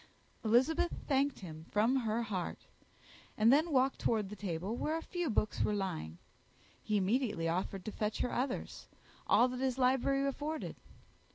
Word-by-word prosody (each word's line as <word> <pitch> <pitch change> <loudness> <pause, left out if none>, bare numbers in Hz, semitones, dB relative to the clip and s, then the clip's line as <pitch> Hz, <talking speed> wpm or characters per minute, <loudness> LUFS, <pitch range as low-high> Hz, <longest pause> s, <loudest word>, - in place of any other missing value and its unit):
Elizabeth 260 +10 +3 0.2
thanked 275 -2 +1
him 160 -4 -8
from 225 +6 +3
her 230 -2 0
heart, 195 -5 -3 0.8
and 225 +4 +6
then 315 +4 +3
walked 265 -1 +2
towards 215 -4 0
a - - -5
table 190 +1 -3
where 310 +6 -1
a 325 - -6
few 350 -4 -2
books 215 -2 0
were 210 - +2
lying. 80 - -3 0.6
He 215 - 0
immediately 205 -3 +1
offered 180 +2 -2
to 215 - -3
fetch 210 0 -2
her - - -1
others; 255 +1 -3 0.4
all 245 - +5
that 250 0 -5
his 260 -1 0
library 265 +2 +2
afforded. 300 +3 -3
235 Hz, 160 wpm, -34 LUFS, 205-270 Hz, 0.8 s, and